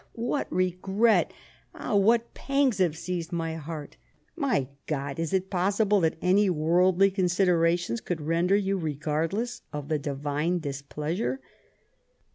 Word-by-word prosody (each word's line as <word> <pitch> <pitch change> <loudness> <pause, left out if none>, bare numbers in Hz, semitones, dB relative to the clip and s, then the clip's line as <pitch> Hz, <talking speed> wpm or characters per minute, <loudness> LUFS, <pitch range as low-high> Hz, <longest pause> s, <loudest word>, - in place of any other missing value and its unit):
ah, - - -34
what 240 +5 -2
regret! 190 +5 +2 0.4
ah, - - -2
what 225 +4 +3
pangs 275 -6 +1
have 170 -4 +2
seized 175 0 -4
my 165 -2 -2
heart 160 -1 -7 0.4
1 285 -5 -2
My 140 - +1 0.2
God, 140 -1 -3
is 165 -2 -2
it 190 0 -1
possible 200 +3 +2
that 160 -2 +1
any 195 +2 +4
worldly 180 +4 +3
considerations 175 - +1
could 175 -2 -3
render 170 +5 +2
you 195 -1 0
regardless 160 - -2
of 145 -2 -6
the 155 -1 +1
Divine 145 +4 -1
displeasure 150 - -3
175 Hz, 135 wpm, -27 LUFS, 155-195 Hz, 0.4 s, any